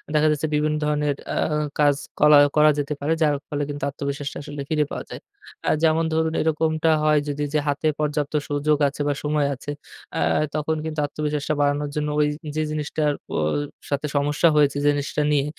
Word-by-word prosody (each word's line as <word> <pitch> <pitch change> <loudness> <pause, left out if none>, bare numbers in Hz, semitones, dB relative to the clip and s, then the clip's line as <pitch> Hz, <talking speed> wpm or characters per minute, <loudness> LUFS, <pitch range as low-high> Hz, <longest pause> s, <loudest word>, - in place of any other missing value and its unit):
দেখা 150 +1 +4
যাচ্ছে 150 +1 -1
বিভিন্ন 150 +1 +1
ধরনের 150 -1 0
অ্যা - - -2 0.4
কাজ 145 -1 +5 0.2
করা 150 0 +7 0.2
করা 155 0 +6
যেতে 145 +1 -2
পারে। 150 +3 +1
যার 150 -2 +3
ফলে 145 0 -2
কিন্তু 145 0 -5
আত্মবিশ্বাসটা 140 0 -4
আসলে 145 -1 -6
ফিরে 150 -2 +2
পাওয়া - - -5
যায়। - - -8 0.5
আ - - +4
যেমন 160 0 +3
ধরুন 160 0 +1
এরকমটা 160 0 +1
হয় 150 -1 +4
যদি 145 0 -2
যে 150 - +3
হাতে 145 +2 0
পর্যাপ্ত 150 -1 -1 0.2
সুযোগ 145 +1 +1
আছে 145 +1 -5
বা 145 - +2
সময় 150 -1 +1
আছে, 145 +3 -7 0.4
অ্যা - - 0 0.3
তখন 155 +1 0
কিন্তু 155 -1 -3
আত্মবিশ্বাসটা 150 0 -2
বাড়ানোর 145 0 +1
জন্য 150 0 -1
ওই 150 - +4 0.3
যে 155 - +1
জিনিসটার 150 0 -1
পো - - -6 0.5
সাথে 140 +1 -1
সমস্যা 145 +3 +2
হয়েছে, 145 -1 +3
যে - - +6
জিনিসটা 145 +1 -2
নিয়ে 140 -1 +2
150 Hz, 185 wpm, -23 LUFS, 145-155 Hz, 0.5 s, করা